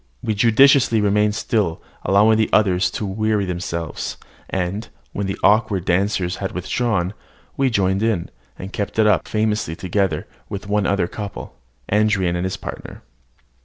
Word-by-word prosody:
We 110 - 0
judiciously 120 +2 +5
remained 105 0 +2
still, 100 -8 0 0.2
allowing 110 +3 +4
the 110 - +2
others 95 -3 +3
to 105 - -4
weary 105 +1 0
themselves; 85 -3 -4 0.3
and, 95 +3 -3 0.2
when 100 -1 -2
the 95 - -3
awkward 105 -3 +3
dancers 90 0 0
had 95 - -4
withdrawn, 95 0 -1 0.4
we 135 -1 +2
joined 95 -3 +1
in, 110 -6 0 0.3
and 95 +2 -8
kept 100 0 -3
it 110 - +4
up 105 - +3
famously 105 -6 -1
together 95 -2 -1 0.2
with 100 0 -5
one 105 -1 +1
other 100 -3 +1
couple, 100 0 -7 0.3
Andran 100 -4 +2
and 90 +1 -1
his 95 - -3
partner. - - -8
100 Hz, 150 wpm, -21 LUFS, 95-110 Hz, 0.4 s, judiciously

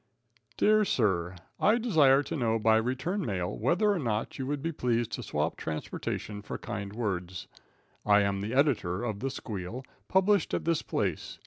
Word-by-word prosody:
Dear 215 0 +4
Sir. 95 - +1 0.2
I 215 +3 +4
desire 150 - +4
to 165 - -4
know 115 -5 +1
by 110 0 +4
return 130 - -1
mail 90 - -2
whether 175 - +2
or 200 - 0
no 115 -6 0
you 130 -2 -5
would 145 0 -2
be 165 - -1
pleased 120 -6 0
to - - -4
swap - - -2
transportation 100 +6 -4
for - - -6
kind 100 -3 -5
words. 95 -5 -3 0.6
I 105 0 +5
am 100 -1 0
the 110 +5 -3
editor 120 - +1
of 110 -4 -3
"The 135 - -2
Squeal," 110 -1 -6 0.2
published 195 +1 +3
at - - -3
this 165 -2 +1
place. - - -2
120 Hz, 175 wpm, -29 LUFS, 100-150 Hz, 0.6 s, I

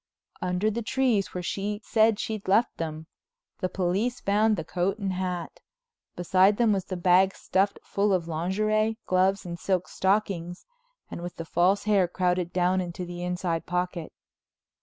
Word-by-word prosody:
Under 180 +4 0
the 235 +3 -3
trees 235 -4 +1
where 180 - -5
she 205 +3 -3
said 220 -1 +3
she'd 215 -2 -4
left 210 +5 +2
them, 160 -1 -4 0.5
the 185 - -1
police 195 +7 -1
found 210 +1 +2
the 165 - -3
coat 185 +5 -1
and 195 -3 -2
hat. 180 -2 -4 0.6
Beside 185 +3 +3
them 230 -3 +3
was 190 -2 -1
the 185 0 -5
bag 185 +2 +4
stuffed 195 +2 0
full 200 +1 0
of 180 -3 +1
lingerie, 215 +7 0
gloves 190 +1 +2
and 170 -1 -6
silk 185 -1 0
stockings, 190 -3 -1 0.5
and - - -6
with 175 0 -6
the 165 - -6
false 180 +5 +2
hair 200 -4 +3
crowded 180 0 0
down 185 +1 +2
into 180 0 -5
the 175 0 -7
inside 180 -2 -2
pocket. 180 -1 -2
185 Hz, 160 wpm, -27 LUFS, 175-205 Hz, 0.6 s, bag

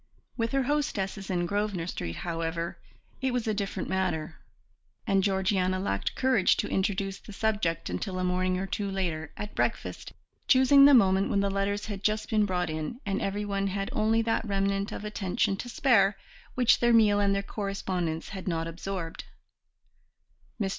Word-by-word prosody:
With 230 -1 -1
her 270 -1 +2
hostesses 215 -9 -2
in 175 -2 0
Grosvenor 200 -2 -1
Street, 85 - -4
however, 165 0 -3 0.4
it 265 0 +1
was 245 -1 -1
a 215 - +1
different 200 -1 -3
matter, 175 -4 -2 0.7
and 195 -3 +2
Georgiana 190 -1 +1
lacked 100 - -2
courage 255 -7 +3
to - - -1
introduce 195 0 -1
the - - -12
subject 200 -6 -1
until 190 -3 -3
a 185 - -1
morning 180 0 +1
or 190 - -2
two 200 +1 -3
later, 175 -5 -2
at 210 - -6
breakfast, - - -2 0.3
choosing 270 +1 +7
the 285 -1 +8
moment 195 -4 +4
when 200 - +2
the 200 0 0
letters 200 +1 -1
had 205 -3 -5
just 215 +1 -1
been 215 -2 +3
brought 180 -3 -1
in 155 +9 -4
and 195 -1 -1
everyone 200 0 -1
had 195 0 -2
only 220 +1 +2
that 225 0 0
remnant 195 -1 -1
of 210 - -6
attention 200 -2 0
to 245 - -6
spare 215 -6 +3 0.4
which 245 -2 +4
their 240 -1 +3
meal 210 -3 +5
and 200 -1 +2
their 200 - -1
correspondence 185 -6 -3
had 190 -1 -7
not 165 -2 -1
absorbed. 170 0 -5 1.3
Mr. 200 -3 0
195 Hz, 170 wpm, -28 LUFS, 185-210 Hz, 1.3 s, the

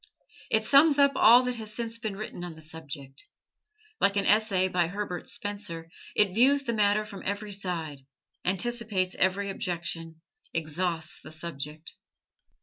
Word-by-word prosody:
It 220 0 +2
sums 285 +4 +6
up 280 -1 +6
all 240 +1 +7
that 250 -1 -2
has 215 -2 -6
since 230 -1 -4
been 215 -3 -3
written 200 -3 -6
on 175 -2 -6
the 160 - -13
subject. 145 -4 -8 0.8
Like 200 0 +3
an 200 - +1
essay 205 -3 +4
by 180 -2 +1
Herbert 180 -1 -5
Spencer, 200 -5 -5 0.2
it 200 -3 +3
views 275 +6 +4
the 235 - -1
matter 210 0 +2
from 200 -2 -9
every 205 +1 -3
side, 175 -7 -3 0.4
anticipates 195 -1 0
every 195 +2 +1
objection 165 -3 -4 0.3
exhausts 165 0 -2
the 155 - -12
subject. 155 -1 -7
195 Hz, 145 wpm, -28 LUFS, 165-215 Hz, 0.8 s, all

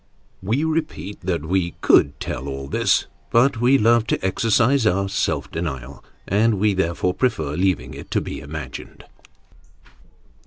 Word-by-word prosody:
We 115 +10 0
repeat 155 - -3
that 85 -4 -2
we 90 0 -1
could 70 - +4
tell 65 +2 -5
all 70 0 -5
this, - - +2 0.2
but 120 0 +3
we 130 +3 +5
love 115 0 +3
to 95 - -1
exercise 115 +5 +2
our 100 0 +1
self 100 - -1
denial, 70 -6 -5 0.2
and 110 +3 +2
we 105 0 +3
therefore 90 -1 0
prefer 95 - -1
leaving 90 +4 0
it - - -10
to - - +1
be - - -6
imagined. - - -8
95 Hz, 145 wpm, -22 LUFS, 85-115 Hz, 0.2 s, we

